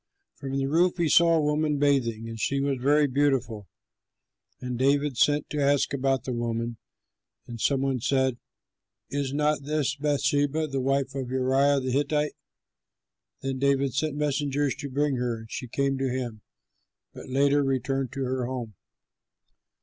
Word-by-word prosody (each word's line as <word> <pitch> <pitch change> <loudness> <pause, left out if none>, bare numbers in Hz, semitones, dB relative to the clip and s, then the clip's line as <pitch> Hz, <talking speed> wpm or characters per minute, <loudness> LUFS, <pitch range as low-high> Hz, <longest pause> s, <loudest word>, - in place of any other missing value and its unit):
From 135 -1 -5
the 135 - 0
roof 175 +6 +2
he 170 -2 +1
saw 170 +2 +5
a 160 - +2
woman 150 0 +1
bathing; 125 -6 +1
and 115 -1 -7
she 140 +5 0
was 135 -1 -1
very 145 +3 +4
beautiful. 130 -7 0 0.9
And 125 -1 -4
David 140 +1 +2
sent 145 +4 +2
to 150 - -1
ask 140 -1 +2
about 135 -1 0
the 130 - -3
woman; 115 0 -2 0.7
and 115 -2 -8
some 135 -2 +2
one 135 -2 0
said, 130 0 +1 0.7
"Is 140 -1 -2
not 150 +1 +1
this 145 -1 -1
Bathsheba, 145 +1 +1
the 135 -3 -3
wife 135 0 0
of 135 -2 -4
Uriah 135 +2 +2
the 130 0 -2
Hittite?" 150 +2 0 1.1
Then 135 -1 -2
David 140 -1 +1
sent 150 +1 -1
messengers 145 -1 0
to 145 -2 -6
bring 140 0 0
her; 120 -2 -1
and 110 0 -12
she 125 - -5
came 135 +2 -1
to 135 -1 0
him, 120 -4 -4 0.7
but - - -10
later 140 +2 +3
returned 135 0 -1
to 135 0 -3
her 130 -1 -2
home. 125 -4 -5
135 Hz, 160 wpm, -26 LUFS, 130-145 Hz, 1.1 s, saw